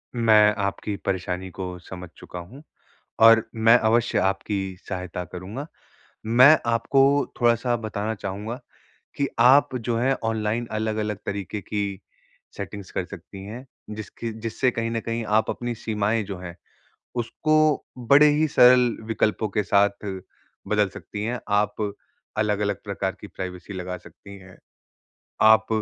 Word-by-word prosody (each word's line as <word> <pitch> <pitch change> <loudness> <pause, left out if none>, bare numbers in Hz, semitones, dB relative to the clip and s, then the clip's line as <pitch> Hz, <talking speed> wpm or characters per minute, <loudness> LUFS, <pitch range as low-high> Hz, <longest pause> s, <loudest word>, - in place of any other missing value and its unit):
मैं 110 -3 +5
आपकी 100 +1 -3
परेशानी 95 0 -2
को 90 -1 -6
समझ 90 0 -9
चुका 90 - -9
हूँ, 120 - -12 0.6
और 115 0 +6
मैं 115 +1 +6
अवश्य 115 +1 +2
आपकी 95 0 -1
सहायता 90 -1 -4
करूँगा। 95 - -7 0.6
मैं 130 +7 +7
आपको 115 +4 +2 0.4
थोड़ा-सा 120 0 +2
बताना 110 -1 -3
चाहूँगा 105 +5 -5 0.6
कि 140 - 0
आप 130 +2 +5
जो 115 -1 -1
है 130 +3 +2
ऑनलाइन 110 +1 -1
अलग-अलग 110 -1 -2
तरीके 100 +1 -4
की 100 -2 -3 0.6
सेटिंग्स 100 0 -7
कर 95 - -2
सकती 95 +1 -10
हैं, 120 +5 -8 0.2
जिसकी 110 +2 -6
जिससे 120 +3 0
कहीं 115 0 -2
न 115 - -1
कहीं 115 0 -3
आप 110 +1 +2
अपनी 120 -1 -3
सीमाएँ 110 0 -1
जो 95 -2 -6
हैं, 85 -1 -8 0.6
उसको 155 +5 +1
बड़े 140 +5 +6
ही 155 +1 +2
सरल 125 -3 +5
विकल्पों 110 0 0
के 105 +1 0
साथ 100 +1 +2 0.6
बदल - - +2
सकती 105 0 -7
हैं। 120 +2 -2
आप 105 0 +1 0.6
अलग-अलग 105 -1 0
प्रकार 100 -2 -2
की 105 - -8
प्राइवेसी 95 +1 -7
लगा 90 0 -5
सकती 100 +2 -14
हैं। 95 -1 -15 0.8
आप 110 0 +6
110 Hz, 135 wpm, -24 LUFS, 100-115 Hz, 0.8 s, मैं